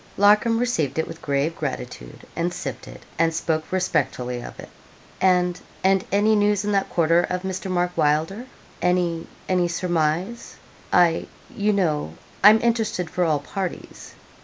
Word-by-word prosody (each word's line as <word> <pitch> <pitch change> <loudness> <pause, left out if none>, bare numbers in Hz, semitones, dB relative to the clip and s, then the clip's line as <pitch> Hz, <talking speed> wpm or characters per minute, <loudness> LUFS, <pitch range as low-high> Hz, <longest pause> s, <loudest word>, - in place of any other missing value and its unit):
Larcom 210 +3 +4
received 160 - 0
it 160 - 0
with - - -9
grave 145 +3 0
gratitude, 125 - -6
and 170 +1 -1
sipped - - -6
it, - - -12 0.2
and 165 0 +3
spoke 160 -1 -2
respectfully 125 -9 -1
of - - -10
it. - - -10 0.5
'And 180 -1 +2 0.2
and 190 0 +3
any 210 +2 +3
news 205 -1 +2
in 210 - 0
that 195 -1 +1
quarter 170 0 +3
of 180 +1 -3
Mr. 190 0 -4
Mark 180 -1 0
Wylder 160 +11 0 0.3
any 175 -2 0 0.2
any 180 -1 +2
surmise? 175 +5 -1 0.4
I 170 -2 +3 0.3
you 210 +1 +1
know 155 - 0 0.3
I'm 215 +2 +8
interested 225 -7 0
for 180 - 0
all 150 -3 +1
parties.' 185 +5 -6
180 Hz, 150 wpm, -23 LUFS, 160-195 Hz, 0.5 s, I'm